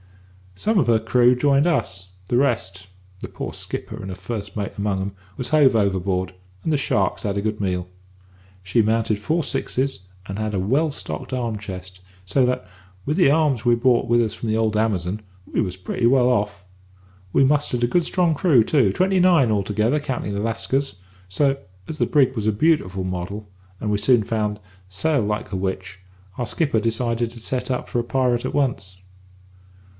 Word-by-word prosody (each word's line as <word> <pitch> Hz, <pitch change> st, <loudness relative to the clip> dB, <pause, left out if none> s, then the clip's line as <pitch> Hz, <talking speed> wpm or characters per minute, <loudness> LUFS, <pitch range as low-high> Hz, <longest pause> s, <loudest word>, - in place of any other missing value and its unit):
"Some 210 Hz, -, +1 dB
of 135 Hz, -, +2 dB
her 115 Hz, -2 st, +4 dB
crew 120 Hz, +2 st, +4 dB
joined 140 Hz, +3 st, +3 dB
us, 95 Hz, -, -1 dB, 0.2 s
the -, -, 0 dB
rest 100 Hz, -8 st, 0 dB, 0.3 s
the -, -, -6 dB
poor -, -, -6 dB
skipper 110 Hz, -, -6 dB
and 95 Hz, -4 st, -7 dB
the 95 Hz, -, -5 dB
first 100 Hz, +1 st, -6 dB
mate 100 Hz, -1 st, -3 dB
among 100 Hz, -1 st, -1 dB
'em 100 Hz, +1 st, -3 dB, 0.3 s
was 125 Hz, -1 st, -3 dB
hove 145 Hz, -5 st, +5 dB
overboard, 95 Hz, -3 st, 0 dB, 0.3 s
and 160 Hz, -, 0 dB
the -, -, +3 dB
sharks 105 Hz, -7 st, 0 dB
had 100 Hz, -1 st, -1 dB
a -, -, 0 dB
good 105 Hz, 0 st, -2 dB
meal. 90 Hz, -2 st, -1 dB, 0.8 s
She 95 Hz, +5 st, +2 dB
mounted 110 Hz, 0 st, +1 dB
four 160 Hz, +10 st, 0 dB
sixes, 130 Hz, -5 st, -2 dB, 0.2 s
and 95 Hz, +1 st, -6 dB
had 110 Hz, 0 st, -2 dB
a -, -, 0 dB
well 135 Hz, -, +2 dB
stocked 80 Hz, -, -6 dB
arm 120 Hz, -3 st, -1 dB
chest, 95 Hz, -2 st, -8 dB, 0.2 s
so 130 Hz, +7 st, +2 dB
that, 125 Hz, -7 st, -2 dB, 0.4 s
with 150 Hz, -, 0 dB
the 175 Hz, -6 st, +5 dB
arms 145 Hz, -6 st, +2 dB
we 120 Hz, -1 st, +4 dB
brought 120 Hz, +1 st, +2 dB
with 120 Hz, 0 st, +4 dB
us 110 Hz, -3 st, -1 dB
from 115 Hz, 0 st, -5 dB
the 110 Hz, -, +1 dB
old 110 Hz, -1 st, +1 dB
Amazon, 105 Hz, -2 st, 0 dB, 0.3 s
we -, -, +1 dB
was 95 Hz, -3 st, -3 dB
pretty 105 Hz, +5 st, 0 dB
well 125 Hz, 0 st, +4 dB
off. 105 Hz, -5 st, -1 dB, 0.7 s
We 135 Hz, -, +4 dB
mustered 135 Hz, -3 st, +1 dB
a -, -, +4 dB
good 175 Hz, +8 st, +2 dB
strong 175 Hz, -1 st, +1 dB
crew 145 Hz, -6 st, +4 dB
too 125 Hz, -6 st, +3 dB
twenty 185 Hz, -, +2 dB
nine 170 Hz, -10 st, +5 dB
altogether, 105 Hz, +7 st, +1 dB
counting 130 Hz, -7 st, -3 dB
the 100 Hz, -, -2 dB
Lascars 115 Hz, +2 st, -1 dB, 0.3 s
so, 135 Hz, +8 st, +1 dB, 0.3 s
as 155 Hz, -, -6 dB
the -, -, +1 dB
brig 135 Hz, -3 st, +3 dB
was 110 Hz, -2 st, -2 dB
a -, -, +4 dB
beautiful 105 Hz, -, +1 dB
model, 95 Hz, +3 st, -4 dB, 0.3 s
and, 105 Hz, -, -3 dB
we 105 Hz, -1 st, +1 dB
soon 110 Hz, +2 st, +4 dB
found, 105 Hz, -1 st, -2 dB, 0.3 s
sailed 120 Hz, +4 st, 0 dB
like 105 Hz, 0 st, -3 dB
a -, -, -2 dB
witch, 95 Hz, 0 st, -4 dB, 0.4 s
our 120 Hz, -, -1 dB
skipper 140 Hz, -1 st, 0 dB
decided 115 Hz, +1 st, -1 dB
to 120 Hz, -, -11 dB
set 125 Hz, +3 st, -3 dB
up 125 Hz, -, -2 dB
for 120 Hz, -, -1 dB
a -, -, 0 dB
pirate 125 Hz, -1 st, 0 dB
at -, -, -3 dB
once. 110 Hz, -10 st, -1 dB
115 Hz, 190 wpm, -22 LUFS, 100-130 Hz, 0.8 s, hove